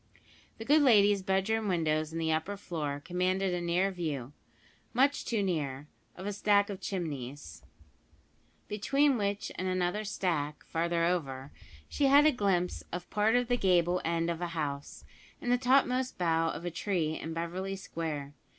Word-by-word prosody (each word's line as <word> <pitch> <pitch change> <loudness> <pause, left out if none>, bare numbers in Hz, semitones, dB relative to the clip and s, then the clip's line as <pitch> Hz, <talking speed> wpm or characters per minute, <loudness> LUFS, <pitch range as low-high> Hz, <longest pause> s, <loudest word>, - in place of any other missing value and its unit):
The 225 - -7
good 300 +5 +5
lady's 205 -6 +5
bedroom 195 +3 0
windows 155 -4 0
in 165 - -5
the 160 -1 0
upper 160 +6 -1
floor 150 -7 -4
commanded 185 +1 0
a 175 - -1
near 175 +3 +1
view 145 -8 -4 0.6
much 275 +3 +3
too 220 -4 0
near 145 -7 -2 0.3
of 185 - -8
a 205 - -2
stack 205 0 +3
of 195 -1 -7
chimneys, 145 -8 -5 1.1
between 275 +7 +2
which 205 -2 -2
and 185 - -1
another 185 +3 0
stack, 165 -7 -2
farther 170 0 0
over, 140 -6 -2 0.4
she 280 - +1
had 285 +2 +7
a 310 - +6
glimpse 195 -7 0
of 180 0 -6
part 215 +2 +2
of 245 -1 +2
the 245 0 +1
gable 180 -3 +2
end 165 0 0
of 170 0 -5
a 175 - -1
house, 140 -2 -4 0.3
and 245 - -2
the 245 - +4
topmost 255 0 +2
bough 165 -2 +2
of 170 - -5
a 175 - -2
tree 170 -3 -1
in 160 - -5
Beverly 180 +4 -3
Square. 155 -6 -5
180 Hz, 165 wpm, -30 LUFS, 165-205 Hz, 1.1 s, had